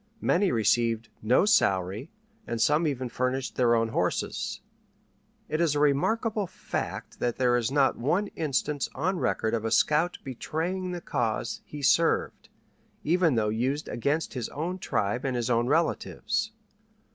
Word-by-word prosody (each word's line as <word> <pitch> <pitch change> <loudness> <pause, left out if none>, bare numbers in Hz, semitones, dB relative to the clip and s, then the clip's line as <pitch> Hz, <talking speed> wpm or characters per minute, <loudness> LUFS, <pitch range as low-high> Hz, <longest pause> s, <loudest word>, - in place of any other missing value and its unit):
Many 185 +1 +2
received 115 0 +1
no 120 - +3
salary, 100 - +2 0.4
and 115 - -3
some 150 +7 +3
even 130 -3 -2
furnished 130 +2 -2
their 120 -2 +3
own 115 0 +1
horses. - - -2 0.9
It 155 - -1
is 160 -4 +2
a - - +1
remarkable 205 - +1
fact - - -5
that 120 -1 0
there 125 -1 +3
is 120 -2 +1
not 135 0 +2
one 170 - +1
instance 145 -1 -1
on 180 +6 -1
record 110 -7 0
of 115 -2 0
a 115 - -1
scout 155 +9 +2
betraying 165 +8 -3
the 175 -1 -4
cause 115 -3 -2
he 145 -1 -8
served, 165 +4 +2 0.5
even 170 -3 +3
though 110 -2 +1
used 130 +7 -1
against 145 +7 -1
his 125 -4 -4
own 175 +5 -4
tribe 110 - -1
and 135 -2 -1
his 120 0 -1
own 120 0 +2
relatives. 170 +7 0
135 Hz, 150 wpm, -27 LUFS, 120-165 Hz, 0.9 s, no